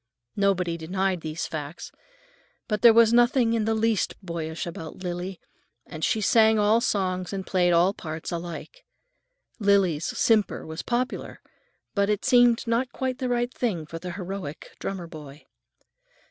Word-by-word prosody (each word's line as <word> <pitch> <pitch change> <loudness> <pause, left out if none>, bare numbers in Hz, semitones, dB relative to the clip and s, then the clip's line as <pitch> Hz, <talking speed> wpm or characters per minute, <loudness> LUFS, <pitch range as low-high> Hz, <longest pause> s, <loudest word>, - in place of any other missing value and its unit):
Nobody 185 -4 +1
denied 185 +2 -1
these 155 +1 -4
facts. 150 +1 -6 0.8
But 210 -2 -1
there 235 - +9
was 230 0 +5
nothing 240 -1 +4
in 225 -2 +1
the 225 0 +1
least 220 -1 +1
boyish 165 -2 -4
about 170 +1 -8
Lily, 180 +1 -4 0.5
and 160 -2 -8
she 220 - +1
sang 220 +1 +5
all 215 +2 +3
songs 185 -5 -1
and 195 -2 -4
played 180 -2 +2
all 175 +3 +4
parts 160 -4 -6
alike. 175 - -6 0.8
Lily's 195 -7 +2
simper 220 -3 +2
was 160 +1 -6
popular, 245 +1 -3 0.5
but 200 0 +1
it 210 -1 0
seemed 245 -2 +4
not 235 +2 0
quite 260 -1 -3
the 255 - -2
right 245 0 0
thing 190 -10 -2
for 165 +2 -7
the 180 0 -6
heroic 185 -4 -7
drummer 190 -3 -4
boy. 150 -3 -11
195 Hz, 150 wpm, -26 LUFS, 170-225 Hz, 0.8 s, there